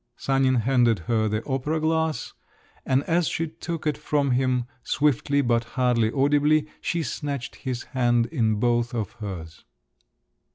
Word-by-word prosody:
Sanin 135 Hz, -1 st, +2 dB
handed 120 Hz, -2 st, +3 dB
her 110 Hz, +5 st, +1 dB
the 110 Hz, +1 st, -2 dB
opera 145 Hz, +4 st, -1 dB
glass, 160 Hz, 0 st, 0 dB, 0.5 s
and 130 Hz, +1 st, +2 dB
as 170 Hz, +1 st, +1 dB
she 165 Hz, -, -1 dB
took 165 Hz, +1 st, -6 dB
it 150 Hz, -, 0 dB
from 140 Hz, -2 st, 0 dB
him, 125 Hz, -1 st, +1 dB, 0.2 s
swiftly, 145 Hz, 0 st, +1 dB
but 120 Hz, -1 st, +2 dB
hardly 120 Hz, -3 st, +2 dB
audibly, 145 Hz, +3 st, +3 dB, 0.2 s
she 170 Hz, -1 st, -1 dB
snatched 140 Hz, -4 st, -4 dB
his 125 Hz, -2 st, -4 dB
hand 120 Hz, -2 st, +1 dB
in 115 Hz, -7 st, 0 dB
both 120 Hz, +2 st, +1 dB
of 110 Hz, -4 st, -2 dB
hers. 85 Hz, -6 st, -7 dB
130 Hz, 140 wpm, -25 LUFS, 120-150 Hz, 0.5 s, handed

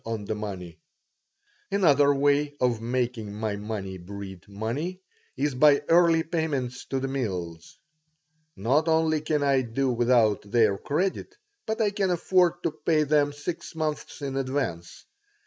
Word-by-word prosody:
on 110 Hz, -2 st, -4 dB
the 110 Hz, -, -2 dB
money 95 Hz, -5 st, -6 dB, 0.9 s
Another 145 Hz, -7 st, +4 dB
way 145 Hz, +1 st, +2 dB
of 120 Hz, -3 st, +1 dB
making 120 Hz, -3 st, -2 dB
my 105 Hz, 0 st, -2 dB
money 100 Hz, -3 st, -5 dB
breed 95 Hz, 0 st, -9 dB
money 120 Hz, -, -4 dB, 0.4 s
is 145 Hz, +1 st, 0 dB
by 140 Hz, +2 st, +5 dB
early 165 Hz, -1 st, +5 dB
payments 145 Hz, -7 st, -2 dB
to 135 Hz, -, -2 dB
the 135 Hz, -, -1 dB
mills. 90 Hz, -11 st, -4 dB, 0.8 s
Not 135 Hz, -, +1 dB
only 160 Hz, -1 st, +2 dB
can 150 Hz, -1 st, 0 dB
I 135 Hz, -2 st, +3 dB
do 130 Hz, +2 st, -1 dB
without 120 Hz, -3 st, +3 dB
their 105 Hz, -2 st, +2 dB
credit, 190 Hz, -, -2 dB, 0.3 s
but 220 Hz, +1 st, -2 dB
I 210 Hz, -2 st, +2 dB
can 200 Hz, -2 st, 0 dB
afford 175 Hz, 0 st, +2 dB
to 165 Hz, -, 0 dB
pay 155 Hz, 0 st, +1 dB
them 145 Hz, 0 st, +2 dB
six 145 Hz, +4 st, -6 dB
months 155 Hz, -2 st, -4 dB
in 135 Hz, -1 st, -3 dB
advance. 130 Hz, -11 st, -3 dB
135 Hz, 145 wpm, -26 LUFS, 110-155 Hz, 0.9 s, by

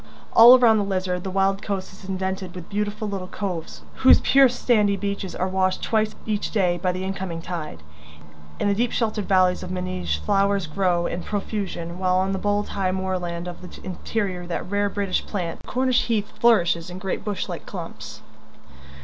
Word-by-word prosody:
All 240 Hz, +3 st, +10 dB
around 225 Hz, -3 st, +5 dB
the -, -, +1 dB
Lizard 185 Hz, -2 st, -2 dB
the 190 Hz, -, -3 dB
wild 195 Hz, +1 st, +1 dB
coast 195 Hz, -3 st, -4 dB
is 190 Hz, 0 st, -12 dB
indented 190 Hz, -1 st, -3 dB
with 180 Hz, -2 st, -9 dB
beautiful 210 Hz, +1 st, -2 dB
little 195 Hz, -2 st, -4 dB
coves 180 Hz, -5 st, -5 dB
whose 260 Hz, -, +7 dB
pure 270 Hz, -1 st, +5 dB
sandy 215 Hz, -4 st, +2 dB
beaches 200 Hz, -1 st, -4 dB
are 185 Hz, -, -1 dB
washed 185 Hz, 0 st, 0 dB
twice 215 Hz, -1 st, +1 dB
each 210 Hz, -1 st, -1 dB
day 180 Hz, -5 st, +1 dB
by 185 Hz, -, +1 dB
the 185 Hz, +1 st, -4 dB
incoming 190 Hz, -3 st, -4 dB
tide. 165 Hz, -, -6 dB, 0.8 s
In -, -, +1 dB
the 200 Hz, -, +3 dB
deep 235 Hz, +4 st, 0 dB
sheltered 215 Hz, -3 st, -1 dB
valleys 185 Hz, -1 st, +3 dB
of 180 Hz, -, -6 dB
Meneage 135 Hz, -, -2 dB
flowers 195 Hz, -, +1 dB
grow 175 Hz, +2 st, 0 dB
in 175 Hz, -, -3 dB
profusion, 190 Hz, -4 st, -4 dB
while 185 Hz, -1 st, +2 dB
on 190 Hz, +1 st, +1 dB
the 195 Hz, -, -1 dB
bold 205 Hz, +1 st, 0 dB
high 190 Hz, -2 st, -1 dB
moorland 180 Hz, -2 st, -3 dB
of 175 Hz, -1 st, -8 dB
the 180 Hz, -, -11 dB
interior 185 Hz, -1 st, -3 dB
that 175 Hz, 0 st, -4 dB
rare 205 Hz, +1 st, 0 dB
British 200 Hz, -1 st, -1 dB
plant 175 Hz, -5 st, -3 dB
the -, -, -19 dB
Cornish 255 Hz, -1 st, +1 dB
heath 215 Hz, -3 st, -1 dB
flourishes 175 Hz, -7 st, +3 dB
in 180 Hz, -, -7 dB
great 190 Hz, 0 st, -3 dB
bush 205 Hz, -1 st, -3 dB
like -, -, -7 dB
clumps. -, -, -8 dB
190 Hz, 185 wpm, -24 LUFS, 180-205 Hz, 0.8 s, All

